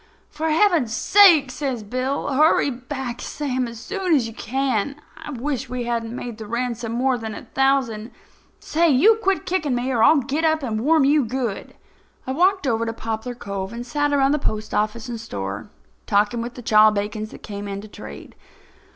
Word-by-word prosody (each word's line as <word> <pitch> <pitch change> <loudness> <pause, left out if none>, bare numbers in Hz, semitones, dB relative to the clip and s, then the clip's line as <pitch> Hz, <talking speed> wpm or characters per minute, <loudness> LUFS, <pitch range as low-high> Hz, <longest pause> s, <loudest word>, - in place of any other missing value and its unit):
"For 315 +1 -2
Heaven's 315 - +3
sake," 335 - +6
says 255 -4 -3
Bill, 255 +6 -2
"hurry 300 0 +4
back, 250 -1 -6
Sam, 260 -4 -2
as 230 -1 -9
soon 370 - 0
as 260 -5 +2
you 225 - -8
can. 265 0 -1 0.2
I 315 0 -10
wish 270 -1 -3
we 250 0 -3
hadn't 235 -1 -3
made 235 -3 -6
the 215 - -7
ransom 235 0 -3
more 255 +1 +1
than 220 -1 -5
a - - -8
thousand. 265 -5 +1 0.5
Say, 335 +2 +1
you 415 - +5
quit 390 -3 0
kicking 315 -8 0
me 245 +2 -1
or 235 -3 +1
I'll 310 +7 +6
get 280 +4 -1
up 315 -2 +2
and 220 -4 -2
warm 305 +2 +4
you 290 +1 +4
good." 240 -3 -4 0.5
I 260 - -3
walked 370 +4 +2
over 230 -3 +1
to 225 - -2
Poplar 225 +2 -4
Cove 200 -4 -5
and 235 +1 -6
sat 290 +4 0
around 275 -1 +3
the 300 - +1
postoffice 215 0 -2
and 235 -2 -5
store, 100 - -5 0.4
talking 210 +3 +2
with 235 +1 -6
the 245 - -9
chawbacons 215 0 +3
that - - -13
came 205 -1 -6
in 200 0 -4
to 215 - -11
trade. - - -11
250 Hz, 185 wpm, -22 LUFS, 225-290 Hz, 0.5 s, sake